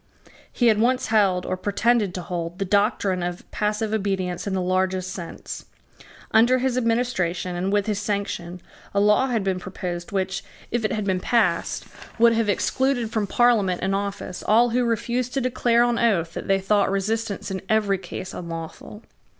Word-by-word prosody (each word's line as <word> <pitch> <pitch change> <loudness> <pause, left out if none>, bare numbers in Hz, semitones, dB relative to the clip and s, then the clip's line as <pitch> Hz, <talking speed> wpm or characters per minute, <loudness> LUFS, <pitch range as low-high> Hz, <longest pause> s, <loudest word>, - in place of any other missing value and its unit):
He 245 - 0
had 220 -2 +5
once 250 0 +1
held, 195 -5 +3
or - - -1
pretended 205 +1 +1
to 180 - -4
hold, 170 0 -4
the 195 - -2
doctrine 200 -1 +1
of 175 0 -4
passive 210 +1 -1
obedience 190 -3 -1
in 195 - -1
the - - 0
largest 185 0 0
sense. 175 -3 -7 0.7
Under 235 +3 +5
his 255 -1 0
administration 230 -8 0
and 185 +2 -1
with 205 -1 +2
his 210 -2 -1
sanction, 195 -4 -3 0.3
a - - +4
law 210 +6 +4
had 230 -5 0
been 190 -1 0
proposed 180 -2 -5
which, 190 0 -1 0.3
if 240 -1 0
it 215 - 0
had 215 -2 -2
been 190 -2 +1
passed, 185 -5 +1 0.3
would 235 0 +6
have 225 -2 +1
excluded 245 +2 0
from 215 -2 -1
Parliament 215 -6 +3
and 195 +1 +1
office 200 -2 -3
all 235 +3 +5
who 245 +1 +2
refused 240 +2 -1
to - - +2
declare 240 -1 +2
on 240 -1 +1
oath 175 -8 +1
that - - -6
they 195 0 +3
thought 200 +1 +2
resistance 205 +1 -2
in 190 -1 -3
every 205 -3 +2
case 185 - -7
unlawful. 170 +5 -7
200 Hz, 175 wpm, -24 LUFS, 185-230 Hz, 0.7 s, would